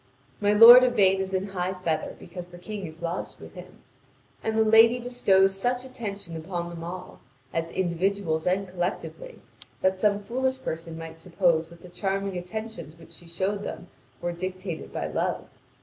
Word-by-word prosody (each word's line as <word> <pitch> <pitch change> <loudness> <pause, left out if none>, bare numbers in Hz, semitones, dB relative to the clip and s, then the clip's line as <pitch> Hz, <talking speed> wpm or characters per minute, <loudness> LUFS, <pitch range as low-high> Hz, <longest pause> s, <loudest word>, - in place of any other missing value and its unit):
My 205 0 +2
lord 235 +4 +10
Yvain 200 -6 +4
is 190 0 -4
in 190 +1 -1
high 185 -1 -2
feather 170 -4 -2
because 175 0 -9
the 175 0 -13
King 195 +1 -6
is 160 +2 -11
lodged 170 +2 -4
with - - -12
him. - - -13 0.6
And 220 0 -1
the 220 - +5
lady 225 +2 +6
bestows 200 -6 +3
such 245 +5 -1
attention 205 -9 -7
upon 170 +1 -4
them 165 -1 -8
all, 180 +2 -8 0.3
as 165 0 -1
individuals 180 -2 -1
and 190 +2 +1
collectively, 185 - -5 0.4
that 190 0 +1
some 205 -1 +2
foolish 260 +4 -1
person 165 0 -5
might 165 0 -9
suppose 170 -2 +1
that 170 0 -16
the - - -10
charming 195 +1 -2
attentions 180 -2 -6
which 165 0 -16
she 170 +1 -14
showed 190 +4 -2
them 180 -2 -7 0.3
were 175 - -1
dictated 185 -1 -5
by - - -3
love. - - -2
185 Hz, 170 wpm, -26 LUFS, 170-205 Hz, 0.6 s, lord